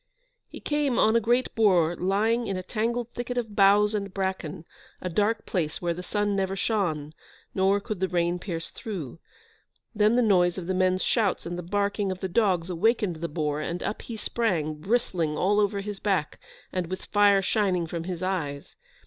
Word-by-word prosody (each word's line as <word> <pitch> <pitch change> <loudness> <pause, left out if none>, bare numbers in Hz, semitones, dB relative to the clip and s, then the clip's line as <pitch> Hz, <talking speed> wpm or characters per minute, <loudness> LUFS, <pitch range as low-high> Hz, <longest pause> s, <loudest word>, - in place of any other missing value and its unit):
He - - -9
came 295 -4 0
on 220 +1 +4
a - - +6
great 240 +3 +1
boar 180 -7 +3
lying 215 +6 +1
in 195 - -2
a 185 - -4
tangled 235 +3 -2
thicket 245 +1 -5
of 220 -4 -3
boughs 205 +1 +5
and 200 -2 -2
bracken, 190 -5 -3 0.3
a 180 - -4
dark 210 +5 0
place 155 -5 -2
where 170 -1 -1
the 175 - -6
sun 205 +2 -1
never 195 0 -1
shone, 165 -8 -1 0.4
nor 195 +1 +3
could 205 -1 -5
the 190 - +1
rain 175 0 0
pierce 170 -3 -5
through. 165 - -6 0.7
Then 215 +1 +3
the 245 - +4
noise 180 -5 +3
of 180 - -5
the 185 - -1
men's 185 0 +2
shouts 215 -6 +1
and 175 +1 -4
the 175 - -4
barking 200 +2 -1
of 185 - -5
the 190 - -2
dogs 185 -3 +1
awakened 195 -1 +1
the 170 +1 -4
boar, 150 -1 -2
and 170 +3 -3
up 210 - -3
he 230 - -7
sprang, 185 -9 -1
bristling 180 -7 0
all 205 +3 +2
over 205 -1 +1
his 205 -1 -6
back, 190 -7 -1 0.3
and 180 -2 -1
with 185 +2 -6
fire 205 -1 +4
shining 185 -4 +1
from 165 0 -5
his 180 -1 -4
eyes. 150 -7 -3
190 Hz, 190 wpm, -26 LUFS, 175-210 Hz, 0.7 s, a